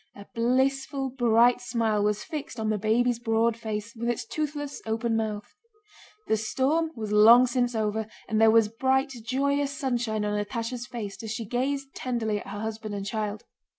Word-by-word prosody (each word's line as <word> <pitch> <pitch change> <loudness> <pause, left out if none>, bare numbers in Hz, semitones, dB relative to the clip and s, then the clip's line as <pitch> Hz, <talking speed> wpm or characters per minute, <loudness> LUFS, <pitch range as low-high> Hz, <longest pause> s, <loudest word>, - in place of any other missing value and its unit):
A 200 - -11
blissful 265 +3 0
bright 240 -1 +4
smile 225 -4 0
was 210 0 0
fixed 300 -7 -6
on 220 0 0
the 210 - -1
baby's 235 +3 +2
broad 230 0 +1
face 220 -1 -5
with 235 +1 -2
its 240 - -2
toothless 290 -2 -4
open 225 +1 0
mouth. 215 -2 -3 0.7
The 220 - +2
storm 270 +9 0
was 215 -3 -5
long 225 +4 +8
since 245 -1 0
over 220 0 -1 0.2
and 220 0 +1
there 225 - +7
was 225 -1 +5
bright, 265 +5 0
joyous 280 +3 0
sunshine 240 -6 -1
on 210 0 0
Natásha's 235 +2 -4
face 210 -5 -6
as 220 - -6
she 225 +1 -4
gazed 270 +4 -2
tenderly 225 -4 -2
at - - -11
her 205 +1 -6
husband 220 -1 -4
and 200 -1 -4
child. 210 0 -3
230 Hz, 175 wpm, -27 LUFS, 215-255 Hz, 0.7 s, long